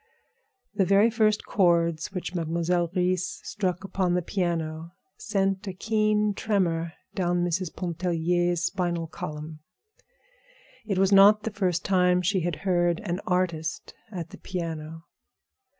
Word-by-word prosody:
The 205 Hz, -2 st, +2 dB
very 200 Hz, +4 st, +4 dB
first 215 Hz, -2 st, +2 dB
chords 170 Hz, -4 st, +2 dB
which 185 Hz, -1 st, -5 dB
Mademoiselle 170 Hz, +1 st, 0 dB
Reisz 185 Hz, 0 st, 0 dB
struck 185 Hz, -2 st, -2 dB
upon 185 Hz, -2 st, 0 dB
the 180 Hz, -, 0 dB
piano 170 Hz, -3 st, -2 dB, 0.3 s
sent 195 Hz, -, -1 dB
a 190 Hz, -, -3 dB
keen 215 Hz, +1 st, +1 dB
tremor 170 Hz, -6 st, 0 dB, 0.2 s
down 175 Hz, -3 st, 0 dB
Mrs. 175 Hz, 0 st, -2 dB
Pontellier's 175 Hz, 0 st, 0 dB
spinal 175 Hz, -3 st, -1 dB
column. 155 Hz, 0 st, -7 dB, 1.3 s
It 195 Hz, -4 st, -1 dB
was 195 Hz, +1 st, +3 dB
not 205 Hz, +2 st, +7 dB
the 225 Hz, -, -3 dB
first 185 Hz, -4 st, -1 dB
time 180 Hz, -1 st, +3 dB
she 190 Hz, +2 st, +2 dB
had 175 Hz, -2 st, -1 dB
heard 175 Hz, -2 st, +2 dB
an 175 Hz, +2 st, -3 dB
artist 170 Hz, -3 st, -1 dB, 0.2 s
at 170 Hz, -4 st, -6 dB
the -, -, -11 dB
piano. 165 Hz, -3 st, -5 dB
180 Hz, 130 wpm, -26 LUFS, 170-195 Hz, 1.3 s, not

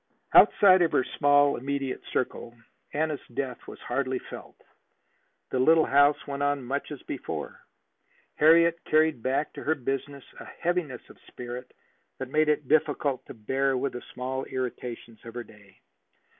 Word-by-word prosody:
Outside 185 Hz, -2 st, +7 dB
of 170 Hz, -, +2 dB
her -, -, +3 dB
small 145 Hz, 0 st, +3 dB
immediate 135 Hz, 0 st, -3 dB
circle 120 Hz, -1 st, -3 dB, 0.4 s
Anna's 155 Hz, 0 st, -1 dB, 0.2 s
death 130 Hz, -3 st, -4 dB
was -, -, -9 dB
hardly 130 Hz, +1 st, -2 dB
felt. -, -, -10 dB, 1.0 s
The 130 Hz, -, 0 dB
little 160 Hz, +4 st, +5 dB
house 145 Hz, +1 st, +4 dB
went 140 Hz, -1 st, -5 dB
on 145 Hz, -1 st, 0 dB
much 140 Hz, +4 st, -4 dB
as 145 Hz, -, -8 dB
before. -, -, -6 dB, 0.7 s
Harriet 170 Hz, +2 st, +4 dB
carried 155 Hz, -5 st, +2 dB
back 135 Hz, +5 st, -1 dB
to -, -, -8 dB
her 160 Hz, -, +1 dB
business 135 Hz, +1 st, -4 dB, 0.2 s
a -, -, -9 dB
heaviness 170 Hz, -8 st, -3 dB
of -, -, -20 dB
spirit 125 Hz, +1 st, -8 dB, 0.5 s
that 130 Hz, -1 st, -6 dB
made 155 Hz, +1 st, +3 dB
it 150 Hz, -2 st, 0 dB
difficult 145 Hz, -2 st, +1 dB
to -, -, -10 dB
bear 130 Hz, +4 st, 0 dB
with 135 Hz, +2 st, -2 dB
the 125 Hz, -, -6 dB
small 130 Hz, +1 st, -3 dB
irritations 120 Hz, -3 st, -6 dB
of 115 Hz, 0 st, -11 dB
her 120 Hz, -, -4 dB
day. 105 Hz, -3 st, -19 dB
140 Hz, 155 wpm, -27 LUFS, 125-150 Hz, 1.0 s, Outside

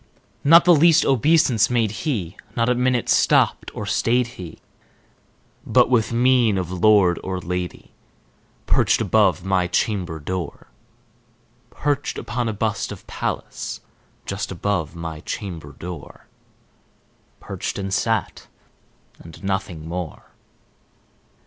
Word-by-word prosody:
Not 165 Hz, +4 st, +7 dB
the 175 Hz, -, +7 dB
least 165 Hz, +1 st, +5 dB
obeisance 135 Hz, -3 st, +3 dB
made 115 Hz, -4 st, +1 dB
he; 105 Hz, -, -3 dB, 0.2 s
not 115 Hz, 0 st, +1 dB
a -, -, +4 dB
minute 125 Hz, -1 st, 0 dB
stopped -, -, +3 dB
or -, -, -4 dB
stayed 125 Hz, +2 st, +1 dB
he; 90 Hz, -9 st, -10 dB, 1.1 s
But, -, -, +3 dB
with 115 Hz, -3 st, +2 dB
mien 120 Hz, -3 st, +3 dB
of 90 Hz, -2 st, -3 dB
lord 95 Hz, -1 st, +4 dB
or 95 Hz, -1 st, -3 dB
lady, 90 Hz, 0 st, -5 dB, 0.7 s
perched -, -, +3 dB
above 95 Hz, -4 st, +2 dB
my 95 Hz, -2 st, +1 dB
chamber 90 Hz, -3 st, -1 dB
door 90 Hz, +1 st, -5 dB, 1.0 s
Perched 145 Hz, 0 st, -2 dB
upon 120 Hz, -2 st, -2 dB
a -, -, -2 dB
bust 110 Hz, 0 st, -2 dB
of -, -, -9 dB
Pallas -, -, -5 dB, 0.4 s
just 100 Hz, 0 st, -4 dB
above 90 Hz, -4 st, -2 dB
my 80 Hz, -2 st, -6 dB
chamber 85 Hz, -5 st, -6 dB
door 85 Hz, +1 st, -9 dB, 1.1 s
Perched, -, -, -5 dB
and 95 Hz, -1 st, -3 dB
sat, 110 Hz, +2 st, -1 dB, 0.7 s
and 85 Hz, +2 st, -13 dB
nothing 95 Hz, -5 st, -3 dB
more. 85 Hz, -2 st, -6 dB
100 Hz, 115 wpm, -22 LUFS, 90-120 Hz, 1.1 s, Not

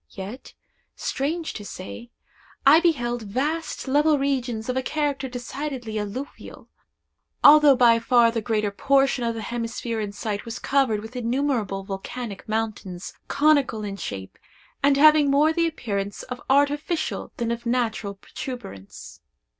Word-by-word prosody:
Yet, 200 Hz, +6 st, -9 dB, 0.4 s
strange 315 Hz, +5 st, -2 dB
to 210 Hz, -, -7 dB
say, 205 Hz, +4 st, -8 dB, 0.6 s
I 290 Hz, +4 st, +8 dB
beheld 245 Hz, -9 st, 0 dB
vast 280 Hz, +11 st, -3 dB
level 295 Hz, +3 st, +3 dB
regions 255 Hz, -5 st, -1 dB
of 255 Hz, -, -1 dB
a 260 Hz, -, +1 dB
character 285 Hz, -1 st, -2 dB
decidedly 245 Hz, -2 st, -5 dB
alluvial, 210 Hz, +7 st, -7 dB, 0.7 s
although 295 Hz, -1 st, +8 dB
by 235 Hz, -2 st, +5 dB
far 230 Hz, 0 st, +4 dB
the 230 Hz, -1 st, -2 dB
greater 215 Hz, -1 st, 0 dB
portion 270 Hz, +3 st, +2 dB
of 230 Hz, -1 st, -1 dB
the 225 Hz, -, -5 dB
hemisphere 230 Hz, 0 st, -3 dB
in 210 Hz, -2 st, -3 dB
sight 205 Hz, 0 st, -4 dB
was 230 Hz, -1 st, -6 dB
covered 265 Hz, -6 st, +1 dB
with 220 Hz, +4 st, -10 dB
innumerable 235 Hz, -5 st, -1 dB
volcanic 200 Hz, +3 st, -6 dB
mountains, 215 Hz, -5 st, -3 dB
conical 285 Hz, -7 st, +2 dB
in 200 Hz, -1 st, -4 dB
shape, 95 Hz, -, -7 dB, 0.4 s
and 280 Hz, 0 st, +4 dB
having 305 Hz, 0 st, +6 dB
more 295 Hz, +3 st, +4 dB
the 335 Hz, 0 st, +2 dB
appearance 205 Hz, -10 st, -4 dB
of 250 Hz, 0 st, -7 dB
artificial 290 Hz, +4 st, +1 dB
than 235 Hz, -1 st, -1 dB
of 235 Hz, 0 st, -4 dB
natural 225 Hz, -4 st, -1 dB
protuberance. 195 Hz, -, -9 dB
245 Hz, 140 wpm, -24 LUFS, 215-280 Hz, 0.7 s, I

